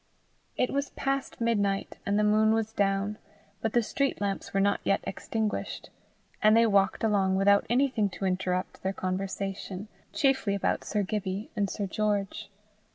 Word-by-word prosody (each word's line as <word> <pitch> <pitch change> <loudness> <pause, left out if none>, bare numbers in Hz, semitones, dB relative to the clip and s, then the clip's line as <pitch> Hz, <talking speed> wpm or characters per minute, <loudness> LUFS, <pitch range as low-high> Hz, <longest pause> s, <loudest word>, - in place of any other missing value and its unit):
It 250 - +1
was 280 0 -1
past 275 0 -2
midnight, 205 -4 0
and 200 +1 +2
the 210 - +3
moon 215 +1 +4
was 220 0 -1
down, 200 0 0 0.4
but 220 -1 -1
the 240 - +3
street 275 +5 -1
lamps 200 -1 -2
were 195 - +1
not 200 +1 +2
yet 195 - +2
extinguished, 220 +2 -3 0.5
and 215 +1 +6
they 230 - +6
walked 200 -2 +2
along 195 -3 +2
without 200 +1 +4
anything 245 -4 +2
to 195 - -3
interrupt 185 0 -1
their 190 +1 -1
conversation 195 +1 -4 0.2
chiefly 265 -9 +2
about 200 - 0
Sir 210 -1 -1
Gibbie 195 0 -3
and 200 -2 0
Sir 205 - -3
George. 205 +1 -1
205 Hz, 160 wpm, -28 LUFS, 195-220 Hz, 0.5 s, and